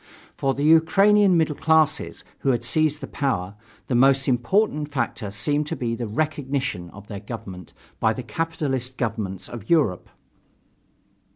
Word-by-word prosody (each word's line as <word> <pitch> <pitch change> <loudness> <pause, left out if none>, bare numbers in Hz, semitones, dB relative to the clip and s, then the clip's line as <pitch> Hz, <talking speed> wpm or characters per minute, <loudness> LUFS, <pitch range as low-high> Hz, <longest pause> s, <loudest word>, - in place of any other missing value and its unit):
For 135 -1 0
the 140 - -2
Ukrainian 190 +5 +5
middle 160 -2 +2
classes, 160 -1 +1 0.2
who 135 - 0
had 120 -2 +1
seized 150 +4 0
the - - -5
power, 100 -10 -2 0.3
the - - -3
most 135 +2 +4
important 150 - +1
factor 115 -6 -2
seemed 145 +10 -1
to 165 - -3
be 120 -5 -2
the 115 0 -3
"recognition" 135 - -2
of 100 +3 -13
their 100 -2 -6
government 95 -5 -9 0.3
by 110 0 +2
the 130 - -6
capitalist 135 -3 -3
governments 105 -5 -3
of 115 -4 -9
Europe. 145 - +2
135 Hz, 150 wpm, -23 LUFS, 115-155 Hz, 0.3 s, Ukrainian